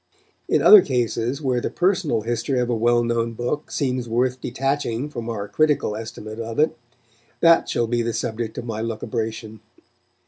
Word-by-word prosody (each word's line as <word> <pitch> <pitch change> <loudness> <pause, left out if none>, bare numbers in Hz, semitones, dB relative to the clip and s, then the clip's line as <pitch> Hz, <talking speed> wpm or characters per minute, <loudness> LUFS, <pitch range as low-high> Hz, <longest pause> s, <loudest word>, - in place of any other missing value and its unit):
In - - +2
other 420 -2 +10
cases, 125 - -1
where 125 -2 0
the - - -2
personal 180 - +1
history 120 +3 -1
of 125 0 0
a - - +1
well 120 +1 +2
known 115 0 -1
book 125 +6 -3
seems 125 -4 -2
worth 125 +2 0
detaching 135 +1 -2
from 120 -4 -5
our 105 -3 -4
critical 150 -5 +1
estimate 110 0 -7
of 115 0 -5
it, 155 +1 +2 0.7
that 165 0 +5
shall 120 - +1
be 120 +1 0
the 115 0 -1
subject 115 0 -4
of - - -5
my 110 -2 -4
lucubration. 110 -1 -4
120 Hz, 170 wpm, -22 LUFS, 115-130 Hz, 0.7 s, other